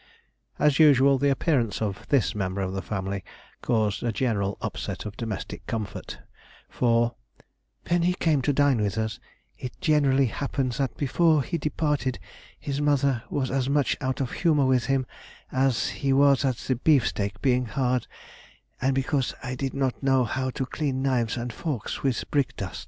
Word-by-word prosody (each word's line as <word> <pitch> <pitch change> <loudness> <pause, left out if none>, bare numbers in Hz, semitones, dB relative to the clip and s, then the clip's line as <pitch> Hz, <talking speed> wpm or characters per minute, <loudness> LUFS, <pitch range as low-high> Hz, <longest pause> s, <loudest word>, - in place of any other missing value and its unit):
As 150 -1 +3
usual 140 -3 +6
the 140 +1 +3
appearance 130 - +1
of 105 -2 -3
this 135 -7 +2
member 100 -1 -2
of 95 0 -2
the 95 - -2
family 95 0 -4 0.4
caused 110 -3 0
a 120 - 0
general 105 -5 -1
upset - - -4
of 105 0 -6
domestic 110 -4 -5
comfort, 110 -3 -5 0.5
for 120 -1 +2 0.7
"when 175 0 +2
he 180 +1 +2
came 155 -6 +2
to 145 - +1
dine 140 -4 +3
with 105 0 -1
us, 110 -1 -2 0.4
it 125 - -7
generally 145 -5 +3
happened 135 +1 -2
that 130 -1 -2
before 155 +1 +3
he 170 +3 -3
departed 150 -3 -1 0.4
his 140 0 -3
mother 140 -4 +2
was 135 -3 -1
as 135 -1 0
much 145 -1 +2
out 130 -1 -1
of 130 -3 -2
humour 150 -5 +2
with 130 -2 +2
him 135 -1 +1 0.5
as 130 -2 +1
he 135 - -1
was 140 0 +4
at 130 -2 +1
the 130 -1 -2
beefsteaks 120 -8 +2
being 125 -1 +1
hard, 125 0 0 0.7
and 130 +1 +2
because 135 0 0
I 130 -1 -3
did 135 +1 -3
not 135 -2 -1
know 135 -2 +3
how 130 +3 -2
to 130 +1 -3
clean 135 -1 -2
knives 125 -4 +1
and 120 0 -4
forks 140 -8 -4
with 130 -4 0
brickdust." 140 -3 -1
130 Hz, 170 wpm, -26 LUFS, 115-140 Hz, 0.7 s, usual